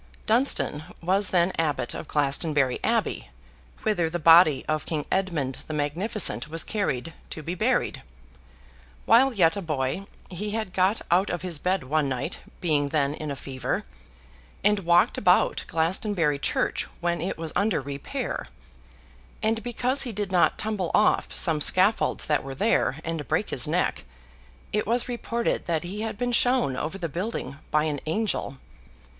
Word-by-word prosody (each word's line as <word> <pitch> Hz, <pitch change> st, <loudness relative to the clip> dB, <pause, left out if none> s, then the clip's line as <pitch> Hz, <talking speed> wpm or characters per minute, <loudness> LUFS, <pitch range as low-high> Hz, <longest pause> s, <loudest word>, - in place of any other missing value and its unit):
Dunstan 220 Hz, -, +2 dB, 0.2 s
was 190 Hz, +3 st, +1 dB
then 175 Hz, 0 st, +2 dB
Abbot 150 Hz, -6 st, 0 dB
of -, -, -7 dB
Glastonbury 140 Hz, -2 st, +1 dB
Abbey, -, -, 0 dB, 0.5 s
whither 175 Hz, -7 st, +1 dB
the 175 Hz, -, -2 dB
body 165 Hz, -3 st, +6 dB
of 155 Hz, -1 st, -1 dB
King 155 Hz, -3 st, -2 dB
Edmund 165 Hz, -9 st, -1 dB
the 155 Hz, -, -4 dB
Magnificent 155 Hz, -, +1 dB
was 165 Hz, +2 st, -1 dB
carried, 165 Hz, -, -2 dB, 0.2 s
to 155 Hz, -, -7 dB
be 170 Hz, -, -3 dB
buried. 180 Hz, -, 0 dB, 1.0 s
While 255 Hz, +4 st, +5 dB
yet 180 Hz, -7 st, +3 dB
a 200 Hz, -, -3 dB
boy, 155 Hz, +3 st, -2 dB, 0.2 s
he 200 Hz, +4 st, -4 dB
had 215 Hz, -5 st, -4 dB
got 190 Hz, +4 st, +2 dB
out 185 Hz, +3 st, +3 dB
of 175 Hz, 0 st, -3 dB
his 175 Hz, -5 st, -2 dB
bed 185 Hz, +1 st, 0 dB
one 145 Hz, +1 st, 0 dB
night 130 Hz, -2 st, -3 dB, 0.2 s
(being 150 Hz, -4 st, +1 dB
then 140 Hz, -1 st, +1 dB
in 155 Hz, 0 st, -6 dB
a 140 Hz, -, -3 dB
fever), 130 Hz, -2 st, -4 dB, 0.8 s
and 210 Hz, +1 st, +3 dB
walked 175 Hz, -1 st, +3 dB
about 180 Hz, -2 st, +3 dB
Glastonbury 165 Hz, -2 st, +1 dB
Church -, -, -1 dB
when 175 Hz, -2 st, -1 dB
it 185 Hz, -, -3 dB
was 160 Hz, -1 st, -6 dB
under 200 Hz, -4 st, +2 dB
repair; 140 Hz, 0 st, -4 dB, 1.0 s
and, 225 Hz, +1 st, +1 dB
because 250 Hz, +4 st, 0 dB
he 245 Hz, -, +1 dB
did 205 Hz, -2 st, -3 dB
not 180 Hz, -2 st, +3 dB
tumble 210 Hz, -5 st, -2 dB
off 210 Hz, -, +3 dB
some 160 Hz, -4 st, +2 dB
scaffolds 190 Hz, +8 st, +2 dB
that 150 Hz, -, +1 dB
were 135 Hz, 0 st, -7 dB
there, 205 Hz, -, +1 dB
and 160 Hz, -4 st, -4 dB
break -, -, 0 dB
his -, -, -1 dB
neck, -, -, 0 dB, 0.7 s
it 210 Hz, -, 0 dB
was 240 Hz, +2 st, +1 dB
reported 235 Hz, -1 st, -2 dB
that 165 Hz, -3 st, 0 dB
he 195 Hz, +5 st, -5 dB
had 220 Hz, -2 st, -3 dB
been 245 Hz, +1 st, -1 dB
shown 245 Hz, -, +2 dB
over 155 Hz, +8 st, -3 dB
the 175 Hz, -3 st, -3 dB
building 165 Hz, -, -4 dB
by 150 Hz, 0 st, +2 dB
an 150 Hz, -2 st, -1 dB
angel. 165 Hz, -6 st, -1 dB
170 Hz, 160 wpm, -26 LUFS, 150-205 Hz, 1.0 s, body